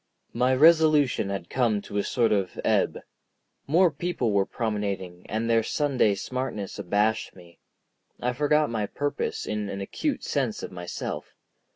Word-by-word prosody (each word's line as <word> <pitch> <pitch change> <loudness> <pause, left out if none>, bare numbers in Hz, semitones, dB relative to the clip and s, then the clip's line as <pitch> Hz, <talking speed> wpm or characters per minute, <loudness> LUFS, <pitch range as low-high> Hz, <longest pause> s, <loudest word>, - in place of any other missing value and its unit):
My 125 +2 +2
resolution 155 -6 +5
had 95 -3 -4
come 120 -5 +1
to 105 - -5
a - - 0
sort 115 -3 +1
of 100 -4 0
ebb. - - +1 0.7
More 170 +4 +4
people 150 -6 -1
were 100 -1 +2
promenading, 100 -5 -3
and 110 +2 -1
their 115 -1 +4
Sunday 130 -4 +1
smartness 115 -2 -4
abashed 105 +4 0
me. 85 -2 -16 0.6
I 125 +1 -1
forgot 150 +1 +2
my 110 -3 -1
purpose 145 +5 -3
in 105 -1 -3
an 100 - -4
acute 275 - -2
sense 130 -7 -1
of - - -6
myself. 90 -1 -6
115 Hz, 150 wpm, -26 LUFS, 100-140 Hz, 0.7 s, resolution